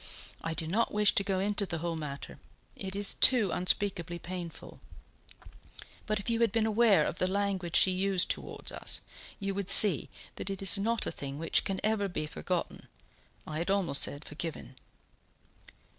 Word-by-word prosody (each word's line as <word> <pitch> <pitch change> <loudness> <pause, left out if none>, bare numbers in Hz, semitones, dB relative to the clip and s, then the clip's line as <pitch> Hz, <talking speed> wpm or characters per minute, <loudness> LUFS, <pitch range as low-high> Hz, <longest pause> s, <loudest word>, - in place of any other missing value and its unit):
I 165 0 -3
do 160 - 0
not 210 +9 0
wish 210 0 +3
to 200 - +2
go 195 -1 -1
into 200 +1 0
the 170 - -4
whole 165 +1 -3
matter, 145 -3 -7 0.4
it 190 0 -6
is 200 0 +3
too 240 -7 +4
unspeakably 180 -2 0
painful; 170 -1 -8 1.3
but 215 -1 0
if 200 - -9
you 230 -1 0
had 230 -3 +3
been 220 +1 +1
aware 215 -7 +3
of - - -4
the 185 - +1
language 190 -3 -2
she 190 - +5
used 185 0 +2
towards - - -4
us, - - -1 0.4
you 195 -1 -3
would 195 -1 -3
see 195 -6 +7 0.3
that - - -5
it 195 -1 -5
is 195 - +6
not 225 +3 0
a - - -3
thing 140 0 -7
which 165 +2 +1
can 195 -1 -2
ever 215 -2 +1
be 175 -4 -3
forgotten 175 +3 -4 0.6
I 155 0 -5
had 170 - -3
almost 185 -8 +1
said 145 +1 -1
forgiven." 150 -3 -7
190 Hz, 175 wpm, -30 LUFS, 170-205 Hz, 1.3 s, see